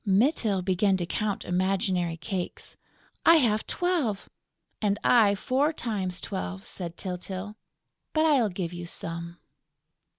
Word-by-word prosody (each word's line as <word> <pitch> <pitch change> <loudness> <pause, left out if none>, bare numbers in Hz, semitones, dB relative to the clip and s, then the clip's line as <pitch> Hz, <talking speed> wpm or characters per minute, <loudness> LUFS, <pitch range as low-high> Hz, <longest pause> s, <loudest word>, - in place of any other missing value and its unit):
Mytyl 205 - +2
began 190 +1 +2
to 175 - -1
count 205 +3 -2
imaginary 185 -2 0
cakes: 175 +2 -5 0.5
"I 330 - +8
have 225 -8 +2
twelve!..." 320 - -1 0.5
"And 205 -1 +2
I 215 -5 +5
four 265 +9 +1
times 195 - -3
twelve!" 90 - -4
said 175 -2 -6
Tyltyl. 190 +2 -5 0.6
"But 310 0 +2
I'll 270 -8 +4
give 180 -2 -4
you 175 -1 -6
some...." 170 0 -4
195 Hz, 125 wpm, -27 LUFS, 180-220 Hz, 0.6 s, I